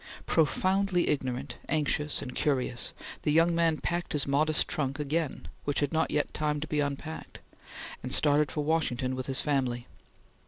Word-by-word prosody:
Profoundly 185 Hz, +3 st, +2 dB
ignorant, 130 Hz, -2 st, -2 dB
anxious, 150 Hz, -1 st, +1 dB
and 125 Hz, -, -7 dB
curious, 130 Hz, -4 st, 0 dB, 0.3 s
the 150 Hz, -, +1 dB
young 165 Hz, +2 st, +4 dB
man 165 Hz, -2 st, +2 dB
packed 175 Hz, +2 st, -2 dB
his 150 Hz, -, +3 dB
modest 155 Hz, +3 st, +2 dB
trunk 140 Hz, -2 st, -2 dB
again, 150 Hz, +1 st, -2 dB, 0.2 s
which 145 Hz, -, 0 dB
had 145 Hz, +1 st, 0 dB
not 160 Hz, 0 st, +2 dB
yet 150 Hz, -, 0 dB
time 150 Hz, -1 st, 0 dB
to 150 Hz, -, -3 dB
be 150 Hz, -, -1 dB
unpacked, 145 Hz, +2 st, -4 dB, 0.6 s
and 130 Hz, -, -5 dB
started 145 Hz, -1 st, +4 dB
for 150 Hz, -, -2 dB
Washington 140 Hz, -5 st, 0 dB
with 130 Hz, 0 st, -5 dB
his 135 Hz, 0 st, +2 dB
family. 130 Hz, -5 st, 0 dB
150 Hz, 160 wpm, -29 LUFS, 135-160 Hz, 0.6 s, young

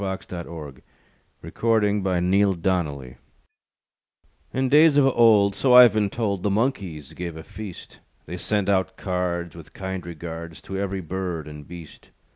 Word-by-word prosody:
THE 95 Hz, -1 st, -2 dB
FEAST -, -, -13 dB
OF 85 Hz, -1 st, -5 dB
THE 75 Hz, -5 st, -9 dB, 0.6 s
MONKEYS 105 Hz, -3 st, +1 dB
BY 95 Hz, -2 st, 0 dB
JOHN 90 Hz, +1 st, 0 dB
PHILIP 95 Hz, -3 st, +2 dB
SOUSA 75 Hz, -9 st, -1 dB, 1.4 s
In 130 Hz, +1 st, 0 dB
days 150 Hz, +2 st, +5 dB
of 140 Hz, -, +5 dB
old, 110 Hz, -6 st, +4 dB
So 125 Hz, +4 st, +3 dB
I've 125 Hz, -4 st, +9 dB
been 105 Hz, -2 st, +1 dB
told, 100 Hz, -4 st, -2 dB
The 105 Hz, -, 0 dB
monkeys 100 Hz, -, -2 dB
gave 85 Hz, -2 st, -6 dB
a 80 Hz, -, -8 dB
feast. 105 Hz, -2 st, -10 dB, 0.3 s
They 90 Hz, +3 st, -6 dB
sent 100 Hz, +1 st, -1 dB
out 95 Hz, -2 st, 0 dB
cards, 90 Hz, -3 st, -3 dB
With 85 Hz, -3 st, -13 dB
kind 95 Hz, -1 st, -5 dB
regards, 85 Hz, -1 st, -8 dB
To 95 Hz, -, -6 dB
every 100 Hz, -1 st, -3 dB
bird 90 Hz, -2 st, -4 dB
and 75 Hz, -1 st, -10 dB
beast. 85 Hz, -3 st, -12 dB
95 Hz, 165 wpm, -24 LUFS, 85-105 Hz, 1.4 s, I've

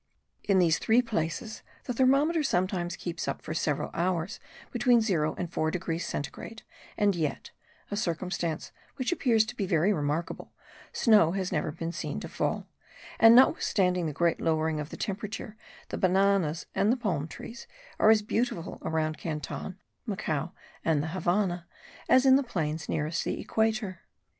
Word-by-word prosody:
In 200 Hz, -2 st, +3 dB
these 170 Hz, -3 st, +4 dB
three 235 Hz, +3 st, +3 dB
places 215 Hz, 0 st, -3 dB, 0.2 s
the 250 Hz, -, -3 dB
thermometer 275 Hz, +6 st, +3 dB
sometimes 180 Hz, -7 st, 0 dB
keeps 175 Hz, -1 st, -5 dB
up -, -, -2 dB
for -, -, -4 dB
several -, -, -1 dB
hours 175 Hz, 0 st, -1 dB, 0.3 s
between 240 Hz, 0 st, +4 dB
0 175 Hz, -9 st, +1 dB
and 175 Hz, -1 st, -5 dB
4 155 Hz, -, +1 dB
degrees 165 Hz, 0 st, -3 dB
(centigrade); 220 Hz, +10 st, -6 dB, 0.3 s
and 205 Hz, -2 st, +3 dB
yet 155 Hz, -4 st, -3 dB, 0.4 s
(a -, -, -1 dB
circumstance 175 Hz, -4 st, -2 dB, 0.2 s
which 255 Hz, +3 st, -1 dB
appears 235 Hz, -10 st, +3 dB
to 240 Hz, +2 st, -7 dB
be 200 Hz, -5 st, -2 dB
very 175 Hz, +4 st, +3 dB
remarkable) 150 Hz, 0 st, -3 dB, 0.4 s
snow 205 Hz, -8 st, +4 dB
has 190 Hz, -2 st, -2 dB
never 155 Hz, -2 st, -1 dB
been 165 Hz, +1 st, -4 dB
seen -, -, -4 dB
to -, -, -6 dB
fall; -, -, -2 dB, 0.5 s
and 225 Hz, +1 st, +8 dB
notwithstanding 180 Hz, -8 st, +4 dB
the -, -, -2 dB
great 170 Hz, +3 st, +1 dB
lowering 160 Hz, -1 st, +1 dB
of 150 Hz, 0 st, -5 dB
the -, -, -8 dB
temperature, 210 Hz, +2 st, -4 dB, 0.3 s
the -, -, -4 dB
bananas 185 Hz, -4 st, +2 dB
and 210 Hz, -, +2 dB
the 255 Hz, -, +1 dB
palm 175 Hz, -, -1 dB
trees 235 Hz, +7 st, -9 dB, 0.3 s
are 215 Hz, -, +6 dB
as 220 Hz, -1 st, +5 dB
beautiful 220 Hz, -5 st, -2 dB
around 155 Hz, -1 st, -1 dB
Canton, 160 Hz, +4 st, -5 dB, 0.3 s
Macao 170 Hz, -6 st, -2 dB, 0.3 s
and 155 Hz, -3 st, +2 dB
the 160 Hz, -, -3 dB
Havannah 175 Hz, 0 st, 0 dB, 0.4 s
as 260 Hz, +1 st, +6 dB
in 265 Hz, 0 st, +7 dB
the -, -, +2 dB
plains 160 Hz, -, -3 dB
nearest 155 Hz, +2 st, -1 dB
the -, -, -3 dB
equator. 215 Hz, -4 st, -1 dB
180 Hz, 160 wpm, -28 LUFS, 160-220 Hz, 0.5 s, and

